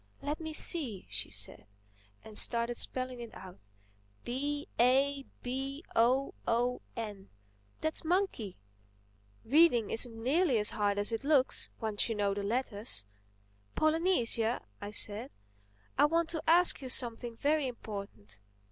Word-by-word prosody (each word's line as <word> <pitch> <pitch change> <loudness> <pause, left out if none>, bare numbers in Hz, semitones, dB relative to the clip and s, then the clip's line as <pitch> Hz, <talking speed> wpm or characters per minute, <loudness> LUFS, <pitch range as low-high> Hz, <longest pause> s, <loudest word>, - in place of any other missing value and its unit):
"Let 295 +3 -3
me 315 -1 -5
see," 275 - +2
she - - -3
said, - - -4 0.6
and 215 - -12
started 235 +2 +3
spelling 255 -1 -2
it 235 -1 -9
out. 185 - -12 0.6
"B 285 +4 -3
A 270 +3 +3 0.2
B 270 +4 -4
O 255 +4 +3
O 245 +2 +1 0.2
N—that's 145 - -6
Monkey. 330 - -1 0.9
Reading 265 -5 +4
isn't 225 -1 +4
nearly 285 0 +2
as 210 -1 +6
hard 205 -1 0
as 205 +2 0
it 225 +3 -3
looks, 280 -3 +2
once 220 -1 +1
you 225 - -1
know 200 -1 0
the 200 - -3
letters." 205 - -1 0.7
"Polynesia," 310 -8 +1 0.2
I 205 - -5
said, 210 +4 -3 0.7
"I - - +7
want 330 +2 +1
to 320 -2 -3
ask 345 -2 +4
you 260 - -6
something 240 -1 +1
very 295 +1 +1
important." 200 - -8
240 Hz, 130 wpm, -31 LUFS, 210-285 Hz, 0.9 s, I